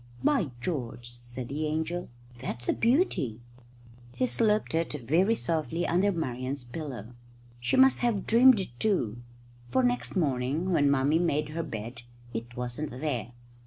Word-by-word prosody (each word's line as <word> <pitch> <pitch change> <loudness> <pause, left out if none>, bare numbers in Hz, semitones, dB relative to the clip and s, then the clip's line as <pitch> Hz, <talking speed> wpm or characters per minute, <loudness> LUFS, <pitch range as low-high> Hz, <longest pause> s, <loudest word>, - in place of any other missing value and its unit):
"By 265 - +2
George!" 120 -7 -4
said 120 +1 -8
the 155 +3 -2
angel, 160 +3 -2 0.3
"that's 120 -1 -5
a - - +3
beauty." 230 - +1 0.8
He 255 - +2
slipped 215 -6 +2
it 165 0 0
very 180 - +3
softly 165 -2 -1
under 185 +4 +2
Marian's 130 -5 -3
pillow. 125 -3 -7 0.5
She 120 +1 0
must 265 0 +6
have 235 -5 0
dreamed 240 0 +6
it 185 - -4
too, 120 - 0 0.5
for 260 - +2
next 245 -2 0
morning 145 +2 0
when 145 -5 +4
Mummy 140 +3 +3
made 150 -3 +1
her 160 +2 -3
bed 120 -5 -6 0.3
it 115 +2 -6
wasn't 125 +4 -3
there. 125 -3 -3
150 Hz, 145 wpm, -29 LUFS, 125-185 Hz, 0.8 s, must